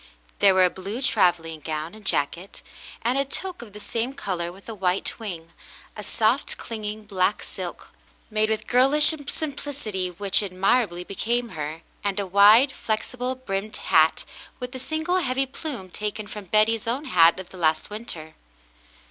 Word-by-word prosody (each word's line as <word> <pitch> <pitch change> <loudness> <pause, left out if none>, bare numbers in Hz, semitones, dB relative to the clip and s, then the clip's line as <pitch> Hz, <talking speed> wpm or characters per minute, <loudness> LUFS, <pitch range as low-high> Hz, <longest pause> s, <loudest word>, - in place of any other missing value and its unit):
There 195 -2 +6
w^ere 185 -1 +6
a - - +3
blue 195 +5 -5
travelling 170 - +2
gown 155 +2 -4
and 215 0 -13
jacket, 170 +2 -1 0.4
and 245 +4 +2
a - - +3
toque 360 +5 -2
of - - -17
the 210 - -10
same 230 +5 -2
color 175 -9 -3
with 190 +2 -16
a 225 - -5
white 185 0 -1
wing; 170 -7 -7 0.4
a - - -6
soft - - +1
clinging 215 -1 -5
black 195 0 0
silk, - - -7 0.4
made 215 0 +2
with 220 -1 -1
girlish 275 +5 +6 0.2
sim 310 -1 -3
plicity 220 -11 -4
which 200 0 +3
admirably 195 -1 +1
became 235 +6 -1
her, 155 -2 -5 0.2
and 200 0 0
a 200 - -1
wide, 205 +8 +7
flexible 250 +3 -3
brimmed 215 -4 -4
hat - - +3 0.3
with 250 0 -6
a 260 - -5
single 315 +6 -1
heavy 270 -5 +1
plume 260 - -7
taken 210 +1 -4
from 205 -1 -8
Betty's 215 +3 +2
own 260 +6 -1
hat 170 - +5
of 190 - -8
the 185 - -12
last 160 +1 +1
winter. 170 -8 -6
210 Hz, 165 wpm, -25 LUFS, 185-250 Hz, 0.4 s, wide